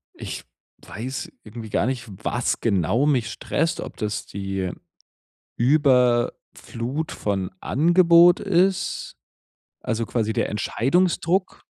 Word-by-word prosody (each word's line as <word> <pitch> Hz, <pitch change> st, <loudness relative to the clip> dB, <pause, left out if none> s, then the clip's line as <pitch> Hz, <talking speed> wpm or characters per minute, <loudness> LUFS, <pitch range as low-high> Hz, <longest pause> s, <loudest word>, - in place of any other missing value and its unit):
Ich -, -, -6 dB, 0.4 s
weiß 130 Hz, +6 st, -6 dB
irgendwie 110 Hz, 0 st, -9 dB
gar -, -, +1 dB
nicht, 125 Hz, -2 st, -2 dB, 0.2 s
was 120 Hz, 0 st, -1 dB
genau 105 Hz, -, +1 dB
mich 130 Hz, -7 st, +1 dB
stresst. 165 Hz, +2 st, -1 dB
Ob -, -, -7 dB
das 105 Hz, 0 st, -3 dB
die 95 Hz, -2 st, -4 dB, 0.9 s
Überflut 125 Hz, +1 st, +1 dB
von 95 Hz, -2 st, -2 dB
Angebot 170 Hz, +3 st, +5 dB
ist, 190 Hz, 0 st, 0 dB, 0.7 s
also 115 Hz, 0 st, -2 dB
quasi 110 Hz, -2 st, -1 dB
der -, -, 0 dB
Entscheidungsdruck. 175 Hz, -, 0 dB
125 Hz, 100 wpm, -23 LUFS, 110-165 Hz, 0.9 s, Angebot